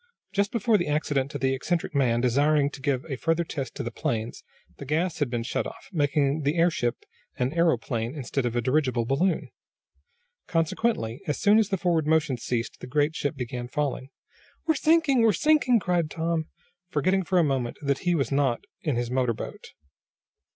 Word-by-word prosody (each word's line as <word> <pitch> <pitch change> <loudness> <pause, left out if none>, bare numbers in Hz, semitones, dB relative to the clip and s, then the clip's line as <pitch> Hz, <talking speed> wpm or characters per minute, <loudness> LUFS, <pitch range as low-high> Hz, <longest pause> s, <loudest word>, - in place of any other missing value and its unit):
Just 200 0 +1
before 225 -2 +2
the 175 - -1
accident 145 -2 0
to - - -5
the 130 +1 +1
eccentric 160 +5 -2
man, 120 -4 +2
desiring 140 +4 +3
to 135 - -10
give 140 -1 0
a 135 -4 -4
further 165 +3 +1
test 135 -6 -5
to 140 - -4
the 120 - -4
planes, 115 0 -3 0.3
the - - -8
gas 160 +5 -1
had 145 -4 +1
been 120 -1 -2
shut 120 - -2
off, - - -12
making 145 -1 +1
the 145 +4 0
airship 160 -8 +2 0.4
an 130 +2 0
aeroplane 125 -7 0
instead 135 -1 -2
of 120 -1 -2
a 120 - +2
dirigible 130 -2 +1
balloon. 165 +8 0 1.0
Consequently, 165 - 0
as 150 - -1
soon 210 +1 +5
as 215 -2 +1
the 195 - 0
forward 170 -4 +1
motion 160 -3 +2
ceased 120 0 -3
the - - -8
great 145 +4 +1
ship 145 +2 -2
began 125 -1 -5
falling. 135 -1 -2 0.6
"We're 320 - +3
sinking! 310 -3 +3
We're 225 -2 +5
sinking!" 295 - +3
cried 175 -5 0
Tom, 165 -1 -1 0.4
forgetting 185 +5 +1
for 185 +1 0
a 175 - +5
moment 135 -5 -1
that 140 -1 +1
he 175 -1 +1
was 140 -3 -1
not 135 -4 +1 0.2
in 150 -5 -1
his 120 0 -2
motor 125 -2 +1
boat. - - -8
145 Hz, 185 wpm, -26 LUFS, 130-170 Hz, 1.0 s, soon